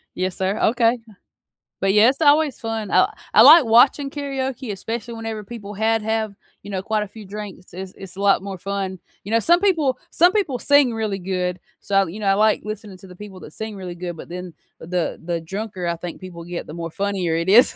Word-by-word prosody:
yes, 185 0 -2
sir, 190 +3 -1
okay, 235 +1 +3 0.8
but, 195 0 +2
yeah, 210 +3 +6
it's 275 +4 -3
always 295 -1 +4
fun, 225 -3 -4
I - - +4 0.2
I 215 - +8
like 305 +6 +10
watching 260 +5 +4
karaoke 270 -4 -4
especially 225 +4 -5
whenever 225 -2 -5
people 205 -2 -8
had 225 +2 +1
have, 220 -1 -1 0.3
you 205 - -8
know, 190 - -2
quite 215 +2 -1
a - - -7
few 215 +1 -12
drinks, 200 -2 -9
it's 185 +1 -7
it's 190 -2 -10
a - - -5
lot 200 -1 +3
more 195 -1 -6
fun, 190 0 -4 0.2
you 205 - -7
know, 230 - +4
some 345 +9 +4
people 320 -10 +2
some 350 +2 +4
people 345 - 0
sing 285 -4 +4
really 215 -3 -2
good, 180 -1 -2 0.2
so, 195 -1 +1
you 180 +6 -8
know, 205 - -2
I 195 - +5
like 215 +1 +3
listening 210 -2 -7
to 190 - -14
the 180 - -13
people 195 -1 -10
that 150 - -11
sing 220 +2 -6
really 180 -2 -7
good 175 -1 -6
but - - -9
then 180 0 -7 0.3
the 175 +1 -2
the 170 0 -2
drunker 190 +2 -5
I 170 - 0
think 170 0 -7
people 180 -3 -9
get 175 0 -6
the 150 - -8
more 165 0 -5
funnier 195 -3 -1
it 170 +1 -2
is 235 +6 +6
205 Hz, 225 wpm, -22 LUFS, 185-230 Hz, 0.8 s, like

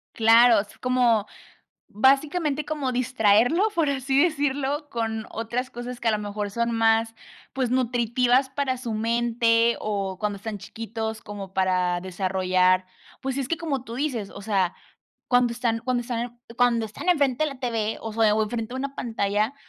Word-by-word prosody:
Claro, 230 -1 +6
es 205 - -14
como 245 -4 +2 0.6
básicamente 285 - +2
como 295 -4 -2
distraerlo, 245 - +3
por 325 -6 +1
así 270 0 +1
decirlo, 290 -2 0
con 225 -2 -3
otras 235 +3 -3
cosas 245 0 -7
que 230 - +2
a - - +3
lo 215 - +1
mejor 205 0 -4
son 235 +2 -1
más, 225 0 +2 0.4
pues 260 -2 -1
nutritivas 250 +1 +2
para 275 -1 -1
su 245 -2 -5
mente 230 +1 +2
o 195 -3 -3
cuando 210 -1 -1
están 205 +1 -6
chiquitos 220 +1 -5
como 200 -2 -8
para 180 -2 +1
desarrollar. 185 0 +1 0.4
Pues 270 0 -3
es 270 -3 -2
que 335 - 0
como 285 -6 -3
tú 230 - -7
dices, 250 -8 -2
o 200 - -10
sea, 195 -4 0 0.6
cuando 245 -1 +3
están 230 -1 -1
cuando 245 0 -1
están 240 0 -4 0.2
cuando 235 -2 +2
están 220 +12 -8
enfrente 285 -5 +2
de 305 - +1
la 275 - -10
TV 225 -4 -2
o 225 - -6
sea 220 -1 +3
o 215 0 +2
en - - -7
frente 235 0 -4
de - - -3
una 275 +1 -4
pantalla, 215 +1 -1
235 Hz, 170 wpm, -25 LUFS, 215-260 Hz, 0.6 s, Claro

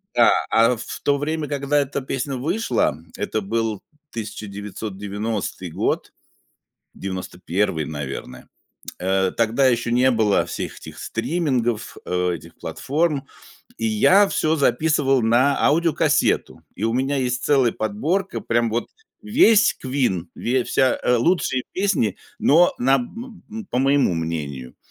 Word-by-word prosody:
да, - - +6 0.2
а 115 +2 +4
в 115 - -7
то 140 0 +2
время, 155 +1 -2
когда 145 0 0
эта 140 0 -2
песня 135 +1 -3
вышла, 160 - 0 0.2
это 105 +1 -2
был 110 0 -2 0.3
1990 105 -2 -5
год, - - -2 0.8
91, 90 -3 -2
наверное. 75 -3 -6 0.5
Э, 95 0 +1
тогда 115 +4 +2
еще 120 -1 0
не 125 +2 +4
было 110 -4 +2
всех - - -5
этих - - -11
стримингов, 120 -4 -1
э, 90 0 0
этих - - -11
платформ, 150 -1 -1 0.5
и 115 0 -1
я 190 - +5
всё 155 +1 +1
записывал 140 -1 +2
на 125 +5 +3
аудиокассету. 155 0 +2
И 100 - -6
у 115 +1 +1
меня 135 +3 0
есть 125 -2 -1
целая 135 -5 +3
подборка, 155 - -2
прям 115 0 +1
вот 115 +2 -2 0.4
весь 215 - +4
Queen, 125 -10 0
ве 125 +1 0
вся, 130 -1 +2
э, 125 - +3
лучшие 130 -1 +1
песни, 185 - 0 0.2
но 170 +5 +5
на, 135 +2 +3
м, 220 - -6
б 220 -1 -7
по 125 - -1
моему 135 -6 +3
мнению. 75 -6 -4
125 Hz, 130 wpm, -22 LUFS, 105-145 Hz, 0.8 s, да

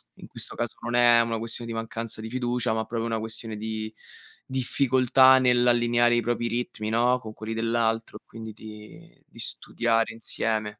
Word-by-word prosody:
in - - -12
questo - - -6
caso 120 0 -3
non 120 0 -3
è 120 -1 +6
una 115 -1 -1
questione 115 +1 -5
di 115 - -4
mancanza 115 0 -3
di 110 - -6
fiducia, 120 -2 -1
ma 110 0 -1
proprio 115 -1 -3
una 115 -1 -1
questione 110 0 -5
di 110 0 -5 0.5
difficoltà 130 0 +4
nell'allineare 120 -1 +3
i 120 - +2
propri 120 +1 -1
ritmi 115 -2 -3
no, 120 +3 +2
con 110 -3 -9
quelli 110 +2 -5
dell'altro, 115 0 -1
e - - -54
quindi 110 -1 -9
di 105 0 -13
di - - -21
studiare 115 -1 0
insieme. 110 -2 -2
115 Hz, 170 wpm, -26 LUFS, 110-120 Hz, 0.5 s, è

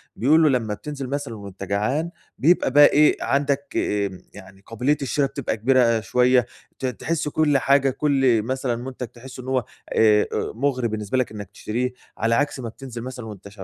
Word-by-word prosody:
بيقولوا 155 +5 +4
لما 115 -5 0
بتنزل 140 +3 -6
مثلًا 140 -5 -4
وأنت 100 -1 -9
جعان 125 - -1 0.3
بيبقى 160 -3 +3
بقي 145 +1 +8
إيه، 150 +1 +4
عندك، 140 0 0
آآ، 100 -3 -1
يعني 95 +1 -14
قابلية 125 +6 0
الشرا 140 +1 +1
بتبقى 135 -4 -3
كبيرة 120 -1 +3
شوية، 125 +4 +3 0.3
ت 130 - -3
تحس 155 +5 -2
كل 150 -1 +2
حاجة، 140 0 +3
كل 135 -4 +2
مثلًا 130 0 -2
منتج 125 0 -6
تحسه 125 +2 -11
إن - - -11
هو، 130 -3 0 0.3
آآ، 105 -1 +5
أُ - - -2
مُغري 130 -2 0
بالنسبة 110 +3 -3
لك 130 - 0
إنك 105 -3 -8
تشتريه، 125 +5 -3 0.2
على 115 +1 +1
عكس 145 0 0
ما 115 -2 -5
بتنزل 120 0 -9
مثلًا 125 -1 -7
وأنت 100 -2 -10
125 Hz, 175 wpm, -23 LUFS, 110-140 Hz, 0.3 s, بقي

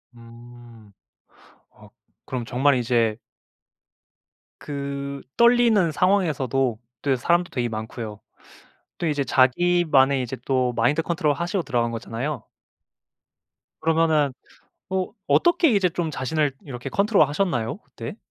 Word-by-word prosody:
음. 115 -2 -15 0.8
어 - - -18 0.4
그럼 125 -2 -4
정말 130 +4 +2
이제 115 -3 +1 1.4
그 140 -1 -5 0.2
떨리는 235 -7 +4
상황에서도 140 - +1 0.2
또 140 - +1
이 - - +4
사람도 175 +7 +1
되게 125 -7 -2
많고요. 110 -1 -6 0.8
또 170 - -2
이제 145 -3 0
자기만의 140 +1 +3
이제 125 - -5
또 130 -2 +1
마인드 120 +7 +1
컨트롤 160 -3 0
하시고 170 +5 -2
들어간 120 -6 -1
거잖아요. 115 +3 -4 1.4
그러면은 160 -3 +2 0.6
어 185 -1 -1 0.2
어떻게 345 -2 +4
이제 195 -4 +3
좀 170 -1 -2
자신을 145 +2 -1
이렇게 130 -1 -7
컨트롤하셨나요 160 - +1
그때? - - -9
140 Hz, 260 characters per minute, -23 LUFS, 120-170 Hz, 1.4 s, 떨리는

